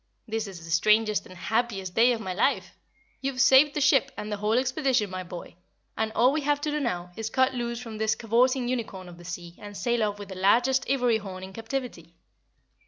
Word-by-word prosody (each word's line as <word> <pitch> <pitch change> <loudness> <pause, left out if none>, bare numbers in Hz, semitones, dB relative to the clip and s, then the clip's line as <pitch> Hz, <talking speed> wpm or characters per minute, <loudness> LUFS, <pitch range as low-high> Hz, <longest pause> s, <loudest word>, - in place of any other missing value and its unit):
"This 225 -1 -2
is 175 -4 -9
the 165 - -8
strangest 215 +5 +3
and 185 - -13
happiest 200 -2 -1
day 235 +4 +5
of 235 - -1
my 185 -3 -4
life. 190 -3 0 0.5
You've 270 -1 -3
saved 270 +2 +6
the 295 - 0
ship 275 -1 +4
and 210 - -5
the 210 - -2
whole 210 +2 0
expedition, 255 -5 +1
my 185 0 -4
boy, 175 -1 -9 0.4
and 220 0 -1
all 245 +3 +4
we 305 +2 -1
have 290 0 +1
to 300 - -1
do 300 - -1
now 180 -10 -3
is 225 0 -4
cut 260 +2 +2
loose 235 -1 -3
from 225 -3 -8
this 220 0 +1
cavorting 245 +3 +2
unicorn 220 -7 -4
of 175 -1 -12
the - - -12
sea 175 -1 -7
and 205 -1 -9
sail 240 -1 0
off 205 -1 0
with 205 -1 -9
the 190 - -7
largest 240 +8 +2
ivory 250 -4 +2
horn 190 -2 -8
in 190 0 -9
captivity. 225 -8 -6
225 Hz, 220 wpm, -27 LUFS, 190-255 Hz, 0.5 s, saved